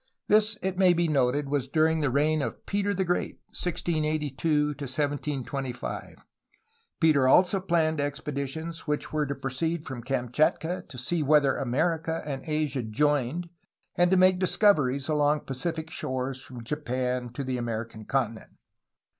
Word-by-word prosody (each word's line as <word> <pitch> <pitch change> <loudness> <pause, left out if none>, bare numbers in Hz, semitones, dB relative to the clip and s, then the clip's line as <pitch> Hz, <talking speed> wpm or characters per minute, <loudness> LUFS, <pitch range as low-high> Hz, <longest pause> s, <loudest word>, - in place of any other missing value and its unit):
This, 215 +1 +4
it 190 0 -2
may 185 -2 +6
be 170 0 +1
noted, 140 -1 +1
was 140 -2 -1
during 160 +2 +2
the 145 - +2
reign 150 +3 +2
of - - -5
Peter 205 0 0
the 195 -1 0
Great 175 -1 -1
(1682 155 -3 0
1725). 140 -2 -3 0.7
Peter 150 -6 +4
also 185 +8 +5
planned 160 -4 +1
expeditions 145 +3 -4
which 150 +1 -2
were 150 -1 +1
to 140 - -3
pro 135 - -4
ceed 160 +4 -1
from 135 -4 -6
Kamchatka 135 +7 0
to 130 - -9
see 160 +7 0
whether 145 -2 +4
America 160 +5 -1
and 135 -3 -4
Asia 150 -3 0
joined 145 +7 0 0.5
and 175 0 +4
to 190 - +4
make 185 0 +5
discoveries 150 -9 +3
along 150 -1 +2
Pacific 160 +4 -3
shores 130 -2 -3
from 125 -3 -9
Japan 125 -2 -2
to 140 - -4
the 130 -1 -2
American 115 -2 -4
continent. 115 -4 -2
150 Hz, 145 wpm, -27 LUFS, 130-165 Hz, 0.7 s, may